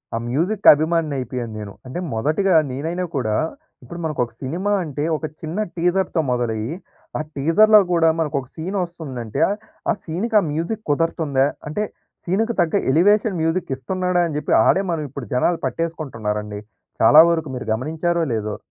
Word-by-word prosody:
ఆ - - 0
మ్యూజిక్ 180 - 0
అభిమానినయిపోయాను 140 -7 -1
నేను. 100 -2 -7
అంటే 130 +7 -5
మొదటిగా 160 - +1 0.2
నేనైనా 165 +7 -3
కూడా, 110 -6 0 0.5
ఇప్పుడు 170 - -9
మనకొక 125 -7 -1
సినిమా 175 +10 -2
అంటే, 145 -2 -4
ఒక 155 - -5 0.2
చిన్న 160 +3 -5 0.2
టీజర్‌తో 180 0 +1
మొదలయ్యి 120 +2 -1 0.4
ఆ - - -1
టీజర్‌లో 210 +10 +6
గూడా 165 -2 +4
మనకొక 140 -4 -1
సీనొస్తుందంటే 160 - -4 0.5
ఆ - - +3
సీన్‌కి 190 +8 -3
ఆ - - -3
మ్యూజిక్ 170 +8 -3
కుదరుతుందా, 145 -3 +1 0.2
అంటే, 210 +8 -1 0.4
సీనుకు 220 +6 0
తగ్గ 170 +2 0 0.2
ఎలివేషన్ 200 +4 +3
మ్యూజిక్ 165 +2 0
ఇస్తున్నాడా, 180 +4 0
అని 155 - -5
చెప్పి - - -1
ఆడే 195 - +4
మనం 160 -2 -2
ఇప్పుడు 135 -1 -7
జనాలు 165 +7 +2
పట్టేసుకుంటున్నారండి. 110 -11 -3 0.4
చాలా 130 +7 +8
వరకు 160 -3 -1
మీరు 125 - -5
గమనించారో 160 +8 -1
లేదో! 105 -1 -3
160 Hz, 140 wpm, -21 LUFS, 130-175 Hz, 0.5 s, చాలా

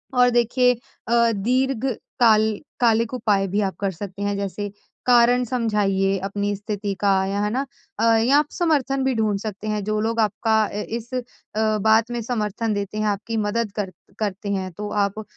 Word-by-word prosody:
और 250 0 +6
देखिए 245 +1 +3
अ, 235 -1 0
दीर्घ 255 +4 0 0.3
काल 220 -3 +4 0.2
कालिक 230 0 +2
उपाय 205 -6 +1
भी 200 +3 0
आप 195 -2 -1
कर 195 -1 0
सकते 195 +2 -8
हैं, 205 0 -1
जैसे 200 +1 -4 0.3
कारण 245 0 +5
समझाइए 205 -5 +1
अपनी 205 +1 -1
स्थिति 205 0 -3
का 200 - +3 0.2
या, 200 +1 -1
है 210 - +1
ना। 265 +4 -1 0.3
अ, - - +1
या 245 +6 +4
आप 300 0 +3
समर्थन 280 -6 +1
भी 265 0 +1
ढूँढ 215 -2 +1
सकते 215 0 -6
हैं, 210 -1 -1
जो 215 +1 -1
लोग 230 +1 -1
आपका 220 +1 +1
अ, 205 - -6
इस 235 +2 -5
अ, 255 - 0 0.6
बात 220 +2 +3
में 240 0 -2
समर्थन 220 -1 -2
देते 200 0 -3
हैं, 215 - 0
आपकी 210 +3 -2
मदद 215 +1 -1
कर 200 -3 -3 0.3
करते 205 -1 -3
हैं, 190 -1 -2
तो 205 +5 -6 0.2
आप 205 +2 -5
215 Hz, 185 wpm, -23 LUFS, 205-235 Hz, 0.6 s, और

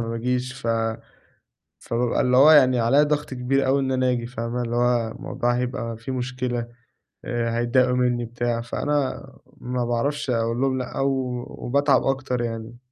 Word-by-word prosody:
ما 115 - -3
باجيش، 125 +2 -2
ف 125 -2 -8 1.1
فبابقى 120 +3 0
اللي 125 -1 +3
هو 145 +4 +8
يعني 130 -5 +6
عليَّ 125 +6 +4
ضغط 150 0 -1
كبير 130 +2 0
أوي 135 +1 +3
إن 135 -1 -1
أنا 130 -1 +2
آجي، 120 -1 -2
فاهمة، 120 0 -4
اللي 120 0 -3
هو 120 -2 +1
الموضوع 120 +2 -2
هيبقى 125 -2 -3
فيه 115 +4 -6
مشكلة، 125 -1 -3 0.6
آآ 115 -1 -1
هيتضايقوا 125 +1 +2
منّي، 125 -1 +1
بتاع، 120 0 -2
فأنا 135 +3 -2 0.3
ما 125 0 -3
باعرفش 140 +4 -1
أقُول 115 0 0
لهُم 135 -1 +1
لأ 125 -1 -4
و 130 -3 -1
وباتعب 140 +1 +1
أكتر 130 -2 -1
يعني. 115 0 -5
125 Hz, 165 wpm, -23 LUFS, 120-130 Hz, 1.1 s, هو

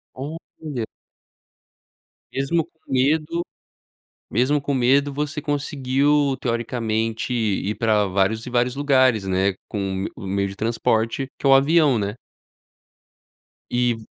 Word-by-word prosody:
Olha. 145 -3 -6 1.5
Mesmo 140 +5 0
com 160 -3 -20
medo, 155 +5 +2 0.9
mesmo 130 +6 +2
com 140 0 -2
medo, 135 +3 +3
você 150 +2 -3
conseguiu 145 -1 +1
teoricamente 115 -1 -1
ir 105 -3 0
pra 110 -2 +2
vários 100 +4 0
e - - -6
vários 125 +1 +1
lugares, 130 -7 +3
né, 95 +1 +1 0.2
com - - -4
o 95 -1 -2
m - - -3
o 95 - -8
meio 100 +1 0
de 100 - -8
transporte 115 +3 0
que - - -7
é - - +5
o - - +8
avião, 145 0 +5
né. 100 0 -2 1.6
E 120 -1 +1
125 Hz, 130 wpm, -22 LUFS, 110-145 Hz, 1.6 s, o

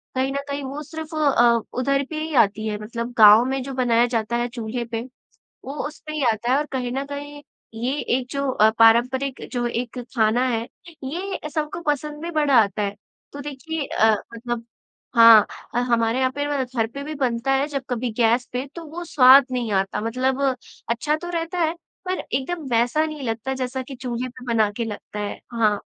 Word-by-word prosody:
कहीं 265 +1 0
न 280 - -2
कहीं 280 0 -3
वो 275 +3 -5
सिर्फ 315 +1 -8
अ, 240 -6 +4 0.2
उधर 275 +2 +1
पे 310 - -4
ही 315 0 -4
आती 215 +2 -4
है 210 - -2
मतलब 235 +2 -5
गाँव 215 +2 +8
में 265 +1 -1
जो 270 +1 -6
बनाया 240 -2 +3
जाता 235 -1 -1
है 240 - 0
चूल्हे 235 +1 -4
पे, 225 0 -4 0.6
वो 275 - -5
उस 300 - -12
पे 305 - -4
ही 300 -3 -1
आता 225 +3 -2
है। 265 - +4
और 295 - 0
कहीं 250 -2 -2
न 270 +2 -2
कहीं 290 +1 -7 0.3
ये 240 +4 -2 0.2
एक 255 - -5
जो 280 -1 -1
अ, 215 -3 +5
पारम्परिक 250 +4 +4
जो 245 -2 -1
एक 240 +1 -4 0.2
खाना 225 +2 +3
है, 230 -1 -1 0.4
ये 335 +3 -4
सबको 300 +3 -3
पसंद 295 +1 -1
भी 340 - -4
बड़ा 295 -4 +2
आता 210 0 -2
है। 200 0 -2 0.4
तो 285 - -7
देखिए 295 +2 -5
अ, 220 0 +3 0.2
मतलब 235 0 -4 0.5
हाँ, 230 -2 +9 0.4
हमारे 230 0 +1
यहाँ 260 0 +2
पे 285 0 -1 0.2
घर 240 -3 -1
पर 280 +5 -7
भी 305 +2 -5
बनता 255 -1 0
है 270 +2 +1
जब 275 -2 -4
कभी 245 -1 -2
गैस 235 +1 +3
पे 250 +2 -2
तो 340 - -7
वो 325 +3 -7
स्वाद 270 -2 +7
नहीं 245 -3 -2
आता। 195 +2 0
मतलब 255 +4 -1 0.5
अच्छा 270 +6 0
तो 350 +3 -7
रहता 335 +1 -3
है 325 -1 +2 0.3
पर 370 0 -1
एकदम 305 +6 -3
वैसा 245 +7 +2
नहीं 305 -2 -6
लगता 230 +4 -3
जैसा 260 0 -3
कि 270 +1 -9
चूल्हे 250 -1 -4
पे 250 +1 -13
बना 220 -2 +3
के 235 - -1
लगता 210 -1 -7
है। 205 0 -4
हाँ। 215 -3 +2
255 Hz, 200 wpm, -23 LUFS, 230-285 Hz, 0.6 s, हाँ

